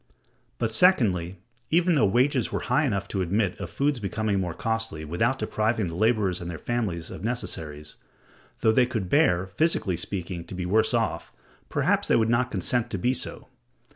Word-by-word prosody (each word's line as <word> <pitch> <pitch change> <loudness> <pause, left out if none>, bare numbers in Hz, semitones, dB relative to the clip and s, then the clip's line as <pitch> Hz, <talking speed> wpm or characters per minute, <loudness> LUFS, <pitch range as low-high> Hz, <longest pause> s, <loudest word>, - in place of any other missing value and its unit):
But, 115 -2 -1
secondly, 100 - +3 0.3
even 175 +2 +3
though 135 -9 +4
wages 125 +5 +2
were - - -2
high 150 - +1
enough 100 -6 -1
to 95 - -1
admit 95 +1 0
of - - -5
food's 140 -2 0
becoming 105 0 -1
more 90 -3 -3
costly 115 -9 -3
without 115 - 0
depriving 110 -5 0
the 80 - -6
laborers 105 -3 +1
and 85 - -5
their 85 - -5
families 100 -9 -3
of - - -8
necessaries; 80 -10 -4 0.6
though 110 - +4
they 125 +2 +3
could 110 -7 -3
bear, 95 - +3
physically 100 - 0
speaking, 90 -1 -4
to 90 - -8
be 90 -1 -3
worse 110 +6 +2
off, 115 -1 -1 0.4
perhaps - - +1
they - - +3
would 110 -1 +2
not 125 +2 +2
consent 120 -2 0
to 100 - -3
be 125 +8 +1
so. - - -3
110 Hz, 180 wpm, -26 LUFS, 90-120 Hz, 0.6 s, though